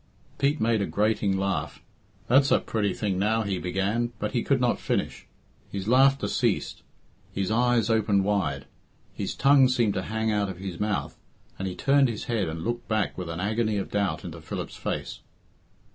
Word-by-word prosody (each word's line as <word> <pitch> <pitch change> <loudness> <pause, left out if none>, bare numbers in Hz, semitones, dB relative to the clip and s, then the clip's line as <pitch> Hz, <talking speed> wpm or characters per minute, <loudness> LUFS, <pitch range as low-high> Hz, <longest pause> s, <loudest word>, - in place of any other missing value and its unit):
Pete 140 +2 +2
made 110 -1 +2
a 100 - 0
grating 105 -2 +1
laugh. 95 -2 -2 0.5
"That's 135 +3 +5
a - - +5
pretty 105 -3 -1
thing 100 -4 -2
now," 110 +3 +1
he 100 -3 -2
began, 100 +7 -1
but 105 0 -3
he 120 - 0
could 140 +1 +1
not 125 -1 +1
finish. - - -2 0.4
His 100 0 -4
laughter 135 +3 +4
ceased, - - -1 0.5
his 100 +1 -2
eyes 120 -1 +2
opened 105 -3 +2
wide, 90 -10 -1 0.5
his - - -4
tongue 135 -1 +5
seemed 120 -5 +2
to 95 - -1
hang 110 +3 -1
out 105 -2 0
of 95 - -6
his 95 -2 -6
mouth, 105 0 -2 0.4
and 95 - -2
he 90 - -4
turned 140 -1 +3
his 110 - -4
head 110 -8 -1
and 80 +1 -5
looked 120 +1 -3
back 110 -1 0
with 90 -2 -5
an 85 +1 -4
agony 110 +2 0
of 100 - -4
doubt 100 -2 -1
into - - -7
Philip's - - -6
face. - - -4
105 Hz, 185 wpm, -26 LUFS, 95-120 Hz, 0.5 s, That's